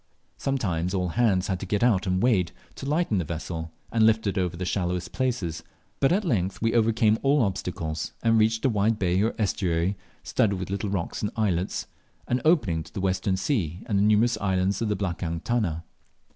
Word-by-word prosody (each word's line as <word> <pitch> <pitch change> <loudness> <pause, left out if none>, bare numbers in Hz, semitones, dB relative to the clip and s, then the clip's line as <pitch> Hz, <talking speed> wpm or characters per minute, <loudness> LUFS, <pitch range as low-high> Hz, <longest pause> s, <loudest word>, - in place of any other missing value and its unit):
Sometimes 95 -10 -1
all 90 -1 0
hands 95 -1 +2
had 95 -2 -2
to 95 - -5
get 105 +4 0
out 105 -6 +3
and 95 +2 +1
wade, 100 -9 +3 0.2
to 135 - -7
lighten 150 - +1
the - - 0
vessel 80 0 -5 0.2
and 115 -1 +3
lift 110 0 +4
it 100 -2 0
over 90 -2 -1
the 90 - -3
shallowest 90 -1 -2
places; 110 - -2 0.4
but 135 - +3
at 200 +3 +1
length 95 - 0
we 115 0 +1
overcame 110 -1 +3
all 140 -1 +3
obstacles 85 -6 -3
and 115 -1 +4
reached 110 +2 +2
a - - +5
wide 110 0 +1
bay 90 -1 +1
or 110 +2 0
estuary 95 -3 0 0.3
studded 100 -3 +1
with 90 0 -5
little 100 +1 -2
rocks 95 -4 -3
and 105 - 0
islets, 95 -4 0 0.4
and 125 +1 0
opening 115 - +3
to - - -12
the - - -5
western 95 0 0
sea 95 - -1
and 100 -3 +1
the - - +3
numerous 110 +3 +3
islands 95 0 0
of 115 - 0
the 105 - +1
"blakang 85 -3 -2
tuna." 95 -9 -1
100 Hz, 200 wpm, -26 LUFS, 90-115 Hz, 0.4 s, a